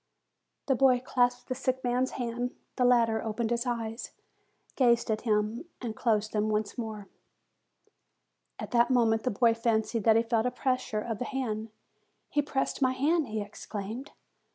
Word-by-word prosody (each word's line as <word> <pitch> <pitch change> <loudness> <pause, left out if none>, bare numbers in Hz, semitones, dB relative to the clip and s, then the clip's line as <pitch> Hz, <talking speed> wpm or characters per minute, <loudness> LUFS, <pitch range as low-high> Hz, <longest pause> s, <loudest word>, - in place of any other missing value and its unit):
The 270 - +2
boy 260 -1 +4
clasped 245 -1 0
the - - -1
sick 260 0 -2
man's 250 +1 0
hand. 245 0 -3 0.2
The 250 - +2
latter 230 -3 +4
opened 225 +1 -2
his 235 +1 0
eyes, 230 -1 -3 0.6
gazed 235 -3 +3
at 215 - -1
him, 215 +6 0
and 230 -3 -5
closed 215 -2 +1
them 215 0 +1
once 210 -1 -1
more. 215 -4 -5 1.5
At - - -7
that 240 0 +4
moment 230 -3 +3
the 235 -5 -2
lad 230 -2 +4
fancied 230 -1 +1
that 220 -1 +6
he 225 - +4
felt 230 0 +1
a - - +2
pres 255 0 0
sure 215 -3 -3
of 225 -1 -4
the 250 - -2
hand. 225 -5 -3 0.6
"He 295 - +2
pressed 275 0 -2
my 260 -1 +3
hand!" 295 +3 +1
he 215 -1 -2
ex 205 - -12
claimed. 220 +6 -5
235 Hz, 175 wpm, -29 LUFS, 220-255 Hz, 1.5 s, that